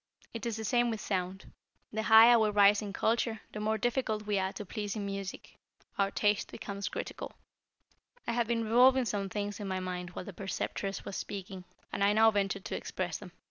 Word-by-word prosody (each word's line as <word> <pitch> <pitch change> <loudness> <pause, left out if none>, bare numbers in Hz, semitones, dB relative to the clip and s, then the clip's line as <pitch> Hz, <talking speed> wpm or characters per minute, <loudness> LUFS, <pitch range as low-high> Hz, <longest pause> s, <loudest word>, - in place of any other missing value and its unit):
It 230 +1 -4
is 225 -2 -2
the 220 - -4
same 240 +3 +2
with 220 -2 -3
sound. 190 -1 -3 0.4
The 220 - -1
higher 225 +2 +8
we 215 -1 +3
rise 205 0 +5
in 205 -2 -5
culture, 225 +1 0
the 215 - -6
more 215 +1 0
difficult 225 -3 -1
we 205 -1 +1
are 190 0 -1
to 210 - -7
please 205 +1 -4
in 205 -2 -3
music. 195 -1 -6 0.4
Our 195 0 +3
taste 205 0 +1
becomes 200 0 -5
critical." - - -6 0.9
I - - -1
had 235 -1 0
been 230 -1 0
revolving 250 +3 +5
some 200 -3 -2
things 205 +1 -3
in 205 - -4
my 190 -1 -2
mind 180 -1 -4
while - - -5
the 200 - -8
Preceptress 195 +1 -4
was 195 - -5
speaking, 190 -2 -6 0.3
and - - 0
I 200 +1 +4
now 220 +1 +6
ventured 195 -1 -1
to - - -3
express 180 -3 -3
them. 190 -4 -11
205 Hz, 205 wpm, -31 LUFS, 195-220 Hz, 0.9 s, higher